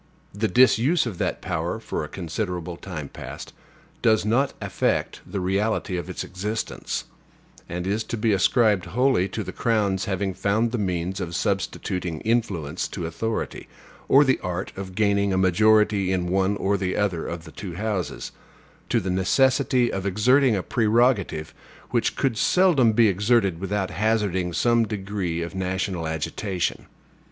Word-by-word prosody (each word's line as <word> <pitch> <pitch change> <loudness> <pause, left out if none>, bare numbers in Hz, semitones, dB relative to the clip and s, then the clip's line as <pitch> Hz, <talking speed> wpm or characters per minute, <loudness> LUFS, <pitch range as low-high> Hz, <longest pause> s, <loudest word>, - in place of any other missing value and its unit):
The 105 +3 0
disuse 130 +7 +4
of 105 -8 -5
that - - -2
power - - -2
for - - -4
a - - -5
considerable 90 0 -4
time 85 -5 -7
past - - -9 0.5
does 110 -2 +3
not 120 +6 +1
affect - - -1
the 100 - -3
reality 95 +1 0
of 90 +1 -4
its 90 - -4
existence; 105 +4 -4 0.7
and 90 +1 -4
is 105 +3 0
to 120 - -4
be 110 0 +2
ascribed 105 -1 +3
wholly 115 +1 +2
to - - -4
the - - -6
crown's 105 -5 0
having 95 0 -1
found 105 +5 +1
the 120 - -2
means 95 0 -2
of 85 -2 -4
substituting 90 -4 -2
influence 95 -9 -1
to 90 - -5
authority, 110 +7 -3 0.4
or 140 +2 +7
the 130 -2 +2
art 90 +1 -4
of 95 -1 -7
gaining 100 -1 +2
a - - +1
majority 105 +1 +3
in 90 -2 0
one 95 +2 +1
or 100 +1 +1
the 95 -1 -2
other 95 -5 -1
of 85 -1 -5
the 80 - -12
two 90 -2 -7
houses, 100 -4 -3 0.6
to - - +3
the 95 - -3
necessity 125 +6 +2
of 95 0 -2
exerting 125 +5 +4
a 95 - -2
prerogative 110 -8 +1 0.4
which - - +1
could 130 -5 0
seldom 170 -11 +4
be 115 0 +5
exerted 100 -2 +2
without 95 0 -2
hazarding 100 -2 0
some 120 +6 +3
degree 95 -5 -3
of 85 - -6
national 95 -2 -2
agitation. 85 +4 -3
100 Hz, 155 wpm, -24 LUFS, 90-110 Hz, 0.7 s, or